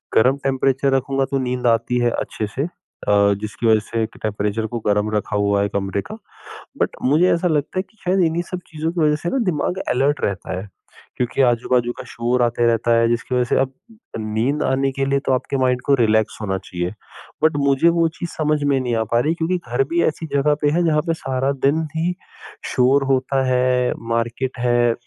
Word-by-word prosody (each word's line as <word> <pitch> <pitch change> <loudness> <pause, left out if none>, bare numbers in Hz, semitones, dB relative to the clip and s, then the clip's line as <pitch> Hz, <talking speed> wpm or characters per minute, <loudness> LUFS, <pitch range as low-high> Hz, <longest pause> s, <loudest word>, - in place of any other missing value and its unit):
गर्म 130 +5 +4
टेंपरेचर 135 0 +1
रखूँगा 135 +1 0
तो 135 - +1
नींद 125 -1 -1
आती 120 +1 +2
है 120 0 +2
अच्छे 110 - -4
से 135 - 0 0.4
अ, 100 0 +4
जिसकी 110 +2 -3
वज़ह 110 -1 +5
से 115 -1 0
ट 110 - -13
टेंपरेचर 105 +1 -1
को 120 - -1
गर्म 105 +1 +2
रखा 105 -1 -2
हुआ 100 0 +2
है 100 - 0
कमरे 100 0 -2
का। 215 - -7 0.6
बट - - 0
मुझे 155 +8 +4
ऐसा 170 +1 +1
लगता 155 +2 0
है - - 0
कि 220 - -30
शायद 185 +1 +1
इन्हीं 165 +1 0
सब 180 - -3
चीज़ों 160 0 -3
की 170 -1 -2
वज़ह 150 -1 +3
से 175 - 0
ना 270 - -1
दिमाग 180 +1 -1
अलर्ट 140 +3 +1
रहता 95 -1 -2
है। 100 +2 -9 0.5
क्योंकि 125 +2 0
आजू-बाजू 120 0 +2
का - - -5
शोर 120 +2 -1
आते 120 0 +1
रहता 115 0 +1
है 115 0 +3
जिसकी 120 +2 -1
वज़ह 125 - +3
से - - +2
अब 135 0 +1 0.5
नींद 110 +7 -1
आने 135 +1 +1
के 135 +1 -1
लिए 140 0 +1
तो - - +3
आपके 130 +2 -1
माइंड 125 -1 +1
को 140 - +3
रिलैक्स 110 -3 +2
होना 95 -3 -1
चाहिए 90 0 -4 0.5
बट 155 -1 +4
मुझे 140 +4 +4
वो 165 - +4
चीज़ 175 - -4
समझ 150 -1 +1
में 140 -2 +2
नहीं 125 -2 -1
आ 110 - +1
पा 120 - +4
रही 150 +6 +1
क्योंकि 170 +2 0
घर 125 +3 +1
भी 170 0 +2
ऐसी 160 +1 -2
जगह 145 +1 +3
पे 145 - +3
है 175 +3 +2
जहाँ 155 -2 +3
पे 165 - +2
सारा 135 -2 -1
दिन 150 +4 +3
ही 170 +3 0 0.6
शोर 130 +2 +4
होता 130 +1 +1
है 125 0 +2 0.2
मार्केट 120 +3 -1
है। 120 -1 +3
130 Hz, 215 wpm, -20 LUFS, 115-145 Hz, 0.6 s, वज़ह